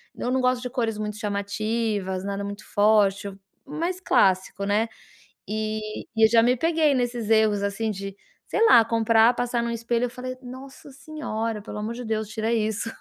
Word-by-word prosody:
eu 245 Hz, -, -3 dB
não 260 Hz, 0 st, +1 dB
gosto 250 Hz, -1 st, +1 dB
de 250 Hz, -, -3 dB
cores 230 Hz, -3 st, -2 dB
muito 210 Hz, -1 st, -4 dB
chamativas, 205 Hz, -2 st, -2 dB
nada 200 Hz, 0 st, -3 dB
muito 205 Hz, +1 st, -7 dB
forte, 205 Hz, -1 st, +2 dB, 0.3 s
mais 335 Hz, +5 st, -3 dB
clássico, 190 Hz, -, +2 dB
né. 210 Hz, +3 st, +1 dB, 0.6 s
E 215 Hz, 0 st, -4 dB
e 225 Hz, -, +5 dB
eu -, -, +7 dB
já 230 Hz, 0 st, +5 dB
me 245 Hz, +2 st, +3 dB
peguei 320 Hz, +1 st, +2 dB
nesses 245 Hz, -3 st, -1 dB
erros 220 Hz, -2 st, +3 dB
assim 200 Hz, +2 st, -1 dB
de 195 Hz, -1 st, -6 dB, 0.3 s
sei 450 Hz, -, +1 dB
lá, 235 Hz, -, +7 dB
comprar, 230 Hz, +1 st, +4 dB
passar 240 Hz, -1 st, -1 dB
num 235 Hz, -, -2 dB
espelho, 235 Hz, +1 st, -1 dB
e -, -, -4 dB
falar: 250 Hz, +1 st, -7 dB
"Nossa 265 Hz, +3 st, -11 dB
senhora, 245 Hz, -7 st, -4 dB
pelo 210 Hz, 0 st, -8 dB
amor 215 Hz, +2 st, -3 dB
de 245 Hz, +1 st, -7 dB
Deus, 220 Hz, -1 st, -2 dB
tira 220 Hz, +1 st, -2 dB
isso". 220 Hz, 0 st, -1 dB
225 Hz, 180 wpm, -25 LUFS, 210-245 Hz, 0.6 s, eu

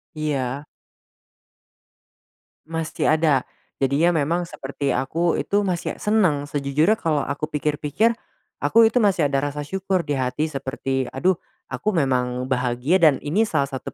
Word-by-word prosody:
Iya. 140 Hz, -2 st, -2 dB, 2.0 s
Masih 165 Hz, -1 st, -3 dB
ada, 155 Hz, -4 st, +3 dB, 0.3 s
jadinya 140 Hz, +5 st, +2 dB, 0.2 s
memang 170 Hz, +4 st, 0 dB
seperti 140 Hz, +1 st, -4 dB
aku 165 Hz, +7 st, 0 dB
itu, 205 Hz, +1 st, +1 dB
masih 180 Hz, -4 st, -3 dB
senang. 175 Hz, -10 st, +1 dB
Sejujurnya 150 Hz, +8 st, +1 dB
kalo 155 Hz, -6 st, 0 dB
aku 140 Hz, +2 st, -3 dB
pikir-pikir, 150 Hz, +9 st, 0 dB, 0.4 s
aku 230 Hz, -1 st, +5 dB
itu 225 Hz, -, -1 dB
masih 190 Hz, -10 st, +3 dB
ada 140 Hz, -, +1 dB
rasa 145 Hz, +1 st, -2 dB
syukur 190 Hz, +4 st, -1 dB
di 145 Hz, -4 st, -2 dB
hati 130 Hz, +4 st, -1 dB
seperti, 135 Hz, -2 st, -3 dB
"Aduh, 180 Hz, +7 st, +1 dB, 0.3 s
aku 215 Hz, -, -2 dB
memang 130 Hz, -4 st, 0 dB
bahagia 125 Hz, +6 st, +1 dB
dan 155 Hz, -7 st, +4 dB
ini 185 Hz, +10 st, +1 dB
salah 145 Hz, -9 st, 0 dB
satu 130 Hz, -2 st, -6 dB
150 Hz, 135 wpm, -23 LUFS, 135-175 Hz, 2.0 s, aku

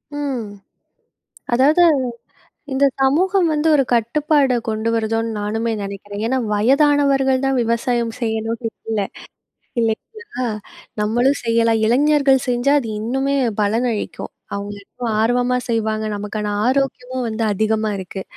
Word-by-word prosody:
ம். 275 Hz, -5 st, -2 dB, 1.1 s
அதாவது 290 Hz, +8 st, +5 dB, 0.9 s
இந்த 265 Hz, +1 st, +2 dB, 0.2 s
சமூகம் 350 Hz, +7 st, +3 dB
வந்து 305 Hz, +1 st, +1 dB
ஒரு 275 Hz, -, +3 dB
கட்டுப்பாட 265 Hz, +3 st, +2 dB
கொண்டு 220 Hz, +1 st, -1 dB
வருதோன்னு 225 Hz, 0 st, 0 dB
நானுமே 220 Hz, +3 st, -1 dB
நெனைக்கிறேன். 200 Hz, +1 st, -6 dB
ஏன்னா, 260 Hz, +3 st, +1 dB
வயதானவர்கள் 270 Hz, +3 st, +3 dB
தான் 270 Hz, -1 st, +1 dB
விவசாயம் 235 Hz, 0 st, 0 dB
செய்யணும்ன்னு 225 Hz, 0 st, -2 dB, 0.2 s
இல்ல, 220 Hz, -2 st, 0 dB, 0.8 s
இல்லைங்களா? 255 Hz, -, -3 dB, 0.5 s
நம்மளும் 240 Hz, +6 st, +2 dB
செய்யலாம். 230 Hz, -1 st, +2 dB
இளைஞர்கள் 275 Hz, +2 st, +3 dB
செஞ்சா 250 Hz, +3 st, +2 dB
அது 235 Hz, -, -6 dB
இன்னுமே 270 Hz, +5 st, 0 dB, 0.2 s
பலனளிக்கும். 220 Hz, +2 st, -1 dB, 0.2 s
அவங்க 200 Hz, +1 st, -5 dB
இன்னும் 240 Hz, +1 st, -5 dB
ஆர்வமா 245 Hz, +2 st, +2 dB
செய்வாங்க. 220 Hz, -1 st, -1 dB
நமக்கான 210 Hz, 0 st, -3 dB
ஆரோக்கியமும் 255 Hz, -1 st, -1 dB
வந்து 225 Hz, +1 st, -2 dB
அதிகமா 215 Hz, +1 st, 0 dB
இருக்கு. 190 Hz, +1 st, -6 dB
235 Hz, 110 wpm, -20 LUFS, 220-270 Hz, 1.1 s, அதாவது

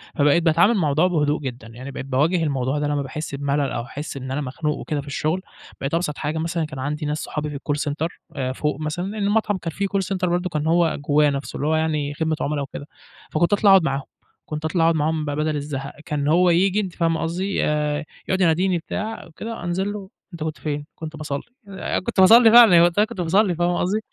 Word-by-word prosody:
فبقيت 150 Hz, +3 st, +3 dB
باتعامل 170 Hz, +7 st, +4 dB
مع 205 Hz, -, 0 dB
الموضوع 155 Hz, +2 st, +3 dB
بهدوء 150 Hz, -4 st, +1 dB
جدًا، 125 Hz, -4 st, -6 dB
يعني 125 Hz, +4 st, -9 dB
بقيت 135 Hz, -, -6 dB
باواجه 155 Hz, +6 st, +1 dB
الموضوع 135 Hz, -1 st, -1 dB
ده 145 Hz, -, 0 dB
لمّا 145 Hz, -1 st, 0 dB
باحس 140 Hz, +1 st, -5 dB
بملل 140 Hz, 0 st, 0 dB
أو 120 Hz, -, -2 dB
أحس 145 Hz, +3 st, -7 dB
إن 130 Hz, 0 st, -6 dB
أنا 140 Hz, +3 st, -1 dB
مخنوق 150 Hz, +3 st, -2 dB
وكده 150 Hz, -2 st, -3 dB
في 140 Hz, -, -15 dB
الشغل، 155 Hz, +5 st, -1 dB, 0.4 s
بقيت 135 Hz, +2 st, -3 dB
أبسط 165 Hz, -3 st, -1 dB
حاجة 155 Hz, +2 st, -2 dB
مثلًا 165 Hz, 0 st, -1 dB
كان 150 Hz, -3 st, -8 dB
عندي 150 Hz, +3 st, -3 dB
ناس 150 Hz, +1 st, -1 dB
صُحابي 150 Hz, 0 st, -4 dB
في 145 Hz, -, -6 dB
الcall 145 Hz, +1 st, -2 dB
center 155 Hz, +3 st, -1 dB, 0.3 s
آآ، 130 Hz, -2 st, -2 dB
فوق 150 Hz, +1 st, -2 dB
مثلًا 155 Hz, +3 st, -3 dB
لإنه 205 Hz, +1 st, -3 dB
المطعم 205 Hz, -1 st, +1 dB
كان 165 Hz, -2 st, -5 dB
فيه 200 Hz, +5 st, -2 dB
call 195 Hz, 0 st, 0 dB
center 185 Hz, -2 st, 0 dB
برضه 180 Hz, +1 st, 0 dB
كان 150 Hz, -1 st, -2 dB
هو 170 Hz, -1 st, +2 dB
جواه 145 Hz, 0 st, +3 dB
نفسه، 140 Hz, 0 st, -4 dB
اللي 145 Hz, -, -2 dB
هو 160 Hz, -, +2 dB
يعني 150 Hz, -2 st, 0 dB
خدمة 160 Hz, +1 st, -1 dB
عملا 145 Hz, 0 st, -1 dB
وكده. 140 Hz, +1 st, -7 dB, 0.4 s
فكُنت 170 Hz, +5 st, +2 dB
أطلع 205 Hz, 0 st, +4 dB
أقعد 190 Hz, -3 st, +7 dB
معاهم، 135 Hz, -2 st, 0 dB, 0.4 s
كنت 155 Hz, 0 st, -5 dB
أطلع 165 Hz, +1 st, +1 dB
أقعد 165 Hz, 0 st, +4 dB
معاهم 155 Hz, 0 st, 0 dB
ب 145 Hz, -, -3 dB
بدل 150 Hz, +1 st, -1 dB
الزهق، 140 Hz, -1 st, -4 dB
كان 150 Hz, -4 st, -2 dB
هو 175 Hz, +4 st, +4 dB
ييجي، 190 Hz, +4 st, +3 dB
أنتِ 190 Hz, -4 st, -3 dB
فاهمة 165 Hz, -2 st, 0 dB
قصدي؟ 185 Hz, +4 st, -1 dB
آآ، 150 Hz, 0 st, 0 dB, 0.2 s
يقعد 190 Hz, 0 st, 0 dB
يناديني 180 Hz, +2 st, +3 dB
بتاع 215 Hz, +6 st, -5 dB
وكده، 220 Hz, +5 st, -7 dB
أنزل 190 Hz, +4 st, -1 dB
له 200 Hz, -2 st, -8 dB, 0.2 s
"أنت 165 Hz, -2 st, -5 dB
كنت 155 Hz, -2 st, -3 dB
فين؟" 145 Hz, +1 st, -3 dB
كنت 160 Hz, 0 st, -7 dB
باصَلّي، 145 Hz, -2 st, -4 dB, 0.3 s
آآ، 195 Hz, -1 st, -3 dB
كُنت 185 Hz, -, -3 dB
باصلي 225 Hz, +5 st, +8 dB
فعلًا 235 Hz, -3 st, +9 dB
يعني 170 Hz, -1 st, +8 dB
وقتها 175 Hz, +5 st, +3 dB
كُنت 215 Hz, -5 st, -6 dB
باصلي، 185 Hz, +2 st, +2 dB
فاهمة 175 Hz, +1 st, +1 dB
قصدي؟ 195 Hz, +4 st, +1 dB
155 Hz, 230 wpm, -22 LUFS, 145-180 Hz, 0.4 s, فعلًا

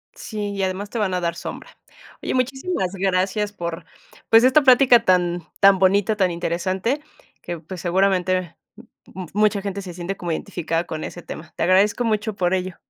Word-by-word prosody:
Sí, 210 Hz, -1 st, -5 dB
y 200 Hz, -1 st, -4 dB
además 190 Hz, +2 st, -3 dB
te 235 Hz, -, -4 dB
van 195 Hz, -3 st, 0 dB
a 180 Hz, -, 0 dB
dar 170 Hz, -1 st, -1 dB
sombra. -, -, -8 dB, 0.5 s
Oye, -, -, -3 dB
muchísimas 260 Hz, -, -1 dB
gracias 195 Hz, +2 st, 0 dB
por, 170 Hz, -4 st, -6 dB, 0.4 s
pues, 225 Hz, +1 st, +7 dB
esta 260 Hz, +4 st, +5 dB
plática 255 Hz, -3 st, +6 dB
tan 175 Hz, -1 st, +2 dB, 0.2 s
tan 195 Hz, -1 st, +6 dB
bonita, 200 Hz, +3 st, +3 dB
tan 190 Hz, -3 st, +2 dB
interesante, 185 Hz, -, -2 dB, 0.4 s
que, 175 Hz, -1 st, -6 dB
pues, 180 Hz, +1 st, -9 dB
seguramente 185 Hz, -1 st, +1 dB, 0.8 s
mucha 210 Hz, 0 st, +2 dB
gente 200 Hz, 0 st, -4 dB
se 180 Hz, -2 st, -8 dB
siente 180 Hz, +2 st, -5 dB
como 175 Hz, -1 st, -4 dB
identificada 165 Hz, -1 st, -2 dB
con 155 Hz, -2 st, -5 dB
ese 175 Hz, -, -7 dB
tema. 160 Hz, -1 st, -10 dB
Te -, -, -2 dB
agradezco 200 Hz, +5 st, +3 dB
mucho 215 Hz, -1 st, -1 dB
por 180 Hz, -1 st, 0 dB
ello. 185 Hz, -1 st, -4 dB
190 Hz, 170 wpm, -22 LUFS, 175-210 Hz, 0.8 s, pues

